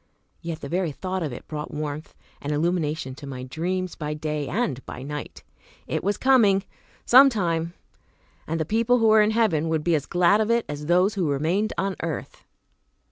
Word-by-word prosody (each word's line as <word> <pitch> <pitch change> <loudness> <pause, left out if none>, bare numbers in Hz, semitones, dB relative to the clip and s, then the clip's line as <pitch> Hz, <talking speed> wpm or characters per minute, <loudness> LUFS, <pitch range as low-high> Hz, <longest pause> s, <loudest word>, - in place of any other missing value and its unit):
Yet 165 -1 -5
the - - -5
very 175 +1 -1
thought 185 +5 -4
of 155 -4 -2
it 120 - -9
brought 150 -1 -5
warmth 150 0 -5 0.3
and 145 - -3
illumination 155 -3 -1
to 140 +2 -10
my 130 -2 -6
dreams 180 +7 -3
by 150 -1 -4
day 150 -1 -3
and 150 - -2
by 125 - -7
night. 150 +1 -7 0.4
It - - -3
was 200 +2 0
coming, 220 -8 +4 0.4
some 270 +3 +8
time! 170 -7 -1 0.7
And 165 +1 -2
the 160 - 0
people 230 +6 +2
who 225 -2 +3
were 215 0 +6
in 210 - +3
heaven 215 -9 +1
would 160 -1 0
be 170 - +2
as 145 -3 0
glad 180 +4 +3
of 215 - 0
it 235 0 +2
as 150 0 -6
those 180 +4 +3
who 185 -7 0
remained 165 +10 0
on 195 -1 -1
earth. 165 -3 -5
170 Hz, 190 wpm, -24 LUFS, 150-200 Hz, 0.7 s, some